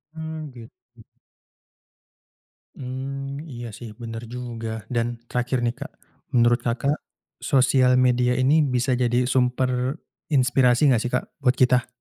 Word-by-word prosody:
Mmm, 160 0 -5
gitu. 115 -2 -11 2.0
Mmm, 135 +3 -6
iya 120 -4 -7
sih 115 +2 -9
bener 115 0 -6
juga 120 -2 -5 0.2
dan 120 -1 +1 0.2
terakhir 125 +1 -1
nih, 120 - 0
Kak, - - -7 0.4
menurut 120 0 +4
Kakak 135 +5 0 0.4
sosial 130 -2 +3
media 125 -1 +3
ini 130 +5 +3
bisa 125 -1 0
jadi 120 0 +2
sumber 125 +1 +1 0.3
inspirasi 130 -1 +3
nggak 120 -3 +3
sih, 125 - -3
Kak, 125 - 0
buat 130 -2 +2
kita? 125 -1 +3
125 Hz, 125 wpm, -24 LUFS, 120-135 Hz, 2.0 s, menurut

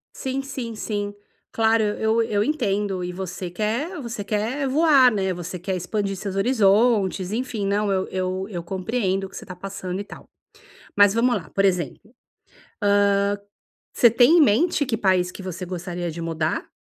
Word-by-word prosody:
Sim, 265 +1 -3
sim, 260 -4 -6
sim. 205 -1 -3 0.4
Claro, 225 0 +3
eu 220 +2 +1
eu 210 -2 +1
entendo 205 -9 -1
e 180 - -3
você 180 -1 -5
quer 230 - -2
você 235 -4 -5
quer 225 +7 -1
voar, 275 -3 +5
né? 190 -3 -1
Você 175 +1 -6
quer 185 +2 -3
expandir 195 +2 -2
seus 195 0 -5
horizontes, 205 -3 +2
enfim, 230 -3 -2
não, 205 +1 +1
eu 190 -1 0
eu 185 +1 -2
eu 175 -4 -5
compreendo 195 +1 -1
o 190 - -9
que - - -15
você - - -9
tá 180 - -8
passando 190 0 -5
e - - -3
tal. - - -13 0.7
Mas 205 -1 +6
vamos 240 +2 +3
lá, 170 - -7
por 195 - 0
exemplo, 190 - -1 0.7
hã, 200 0 +3 0.6
você 235 - +6
tem 245 +9 +5
em - - +7
mente 290 - +3
que 230 - -1
país 185 -3 +2
que 195 - -10
você 185 -1 -5
gostaria 175 -1 -4
de 170 - -7
mudar? 160 -1 -2
205 Hz, 175 wpm, -23 LUFS, 185-230 Hz, 0.7 s, em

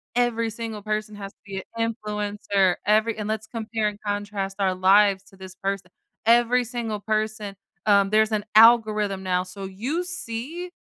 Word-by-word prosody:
every 235 -2 +1
single 225 -1 -6
person 215 0 -3
has 200 -1 -7
to - - -45
be 195 -1 -6
an 230 0 0
influencer 205 -3 0
every 215 +2 +2
and 210 -1 -4
let's 220 0 -3
compare 220 -1 -2
and 210 - -4
contrast 205 -1 -3
our 190 -2 +1
lives 195 +1 +4
to 195 - -19
this 190 -1 -10
person, 195 -1 -2 0.4
every 240 +2 +4
single 225 -3 -4
person, 215 -1 -2 0.3
um, 200 -1 +5
there's 220 +1 +3
an 210 -1 -1
algorithm 215 -3 +5
now, 180 -1 +1
so 185 +2 -9
you 240 - -3
see 345 0 -5
210 Hz, 165 wpm, -24 LUFS, 200-230 Hz, 0.4 s, um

